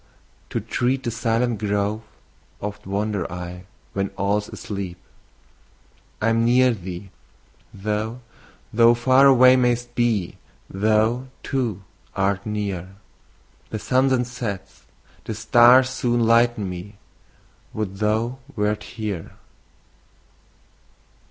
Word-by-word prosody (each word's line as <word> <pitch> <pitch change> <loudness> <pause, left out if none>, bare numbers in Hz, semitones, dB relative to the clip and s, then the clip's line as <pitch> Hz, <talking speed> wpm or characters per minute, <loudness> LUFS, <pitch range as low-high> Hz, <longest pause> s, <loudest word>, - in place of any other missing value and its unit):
To - - -2
tread 130 +2 -1
the 120 - -2
silent 115 0 0
grove 105 +1 -1 0.6
oft 105 -1 -6
wander 100 -3 -2
I, 90 +1 -7 0.3
When 100 0 -1
all's 105 +1 0
asleep. 100 -4 -6 1.2
I'm 115 +1 +2
near 125 +2 +4
thee, 95 -1 -8 0.6
though 110 +4 -3 0.5
thou 115 +1 +6
far 130 +3 +5
away 130 -1 +7
mayst 120 -1 +1
be 115 -7 0 0.3
Thou, 110 +5 +1 0.2
too, 115 -8 -2 0.3
art 100 +1 0
near! 100 -3 -4 0.7
The 110 - -3
sun 130 +5 +2
then 130 -2 +2
sets, 120 -6 -6 0.4
the 110 - -4
stars 125 +3 +6
soon 120 -2 0
lighten 115 -2 +3
me. 90 +3 -7 0.8
Would 100 -3 -4
thou 110 +5 0 0.2
wert 105 0 0
here! 105 -7 -5
110 Hz, 105 wpm, -23 LUFS, 100-120 Hz, 1.2 s, away